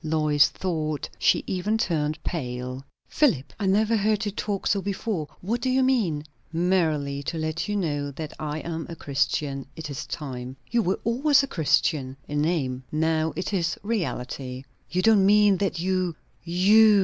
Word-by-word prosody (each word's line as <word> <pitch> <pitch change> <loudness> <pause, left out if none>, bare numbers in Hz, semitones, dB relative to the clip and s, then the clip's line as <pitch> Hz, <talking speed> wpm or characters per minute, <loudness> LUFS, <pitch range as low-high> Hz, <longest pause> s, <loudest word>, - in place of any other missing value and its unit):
Lois 155 -2 +3
thought 155 -5 -2
she - - +3
even 195 +4 0
turned 155 -7 -1
pale. 125 -4 -4 0.2
"Philip! 160 - +1
I 200 - 0
never 215 +4 +3
heard 215 +1 +1
you 205 - -1
talk 200 0 -3
so 200 - +2
before. 195 -4 -2
What 230 +6 -1
do 260 - 0
you 260 +1 +3
mean?" 210 - +1 0.3
"Merely 160 -5 +1
to 165 +4 -4
let 155 +1 -2
you 210 - -1
know 145 -7 -1
that 150 +2 -6
I 155 0 -3
am 165 -1 -4
a 170 - -6
Christian. 140 -1 -1
It 155 -2 -6
is 135 - -5
time." 130 -3 -6
"You 235 0 +3
were 190 -2 0
always 275 +5 +4
a - - -2
Christian!" 150 - +1
"In 145 0 -1
name. 135 -6 0
Now 160 +1 +1
it 185 +3 -3
is 175 -3 0
reality." 130 - -3 0.3
"You 185 +1 0
don't 220 -3 +6
mean 205 0 +5
that 180 -3 -1
you 185 -1 0 0.3
_you! 205 +4 +6
165 Hz, 170 wpm, -25 LUFS, 145-200 Hz, 0.3 s, don't